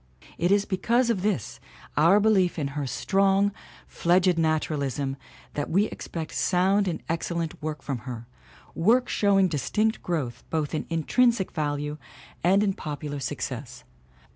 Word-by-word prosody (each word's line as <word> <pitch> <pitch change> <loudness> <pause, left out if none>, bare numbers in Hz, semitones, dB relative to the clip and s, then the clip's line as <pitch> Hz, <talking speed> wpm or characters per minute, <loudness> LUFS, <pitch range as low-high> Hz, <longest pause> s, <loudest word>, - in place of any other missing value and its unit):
It 175 +3 +2
is 200 0 +4
because 235 +5 +1
of 200 -5 -1
this 190 - -2 0.4
our 170 +7 +5
belief 200 -5 +3
in 145 -3 -1
her 140 0 -3
strong, 195 +9 +2 0.3
fledged 180 +1 +2
naturalism 145 -4 0 0.4
that 145 - -3
we 195 +5 +3
expect 165 -6 -6
sound 190 +2 +2
and 175 - -3
excellent 165 0 -3
work 155 -2 -4
from 135 -4 -3
her, 120 0 -7 0.5
work 230 +9 +3
showing 195 -2 +3
dis 150 -6 -3
tinct 220 +1 +1
growth 140 -9 -3
both 155 -3 -1
in 155 - -2
intrinsic 195 - +2
value 150 -1 -2 0.4
and 195 +4 +4
in 200 -2 +1
popular 145 -3 -5
success. 125 -2 -5
165 Hz, 140 wpm, -26 LUFS, 145-195 Hz, 0.5 s, our